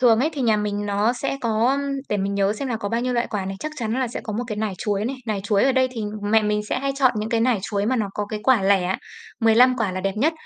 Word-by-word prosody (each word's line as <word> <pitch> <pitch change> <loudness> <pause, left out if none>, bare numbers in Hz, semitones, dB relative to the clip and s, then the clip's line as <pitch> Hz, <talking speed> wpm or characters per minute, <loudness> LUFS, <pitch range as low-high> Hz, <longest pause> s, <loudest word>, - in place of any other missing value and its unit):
Thường 235 -3 +5
ấy, 305 +5 +1
thì 280 - -3
nhà 225 -3 +3
mình 205 0 -2
nó 205 +3 +1
sẽ 275 +2 -3
có, 225 0 +1
ưm, 275 - +1 0.3
để 210 - 0
mình 200 0 -1
nhớ 200 0 +2
xem 265 +5 -4
là 235 - -1
có 205 -2 -4
bao 230 +2 0
nhiêu 250 +1 -1
loại 240 -1 0
quả 205 -3 -2
này. 195 +1 -4
Chắc 305 - -4
chắn 225 -4 -2
là 255 - 0
sẽ 230 - -5
có 215 - -6
một 235 +4 -2
cái 215 -3 -4
nải 215 -1 -1
chuối 205 -1 -1
này. 260 +4 -2
Nải 215 -3 -1
chuối 205 +1 +2
ở 270 - +3
đây 260 0 +3
thì 230 - -5 0.2
mẹ 215 +1 +3
mình 210 0 +1
sẽ - - 0
hay 275 0 -1
chọn 260 -3 +4
những 215 +1 -2
cái 230 -1 +1
nải 240 -1 +2
chuối 200 0 -1
mà 255 +2 +1
nó 215 -3 0
có 210 - -2
cái 210 0 -5
quả 255 -6 +4
lẻ, 190 -1 +2 0.4
15 240 +3 +5
quả 215 -6 -1
là 185 - -3
đẹp 195 +1 -1
nhất. 295 +9 +2
220 Hz, 315 wpm, -23 LUFS, 205-250 Hz, 0.4 s, Thường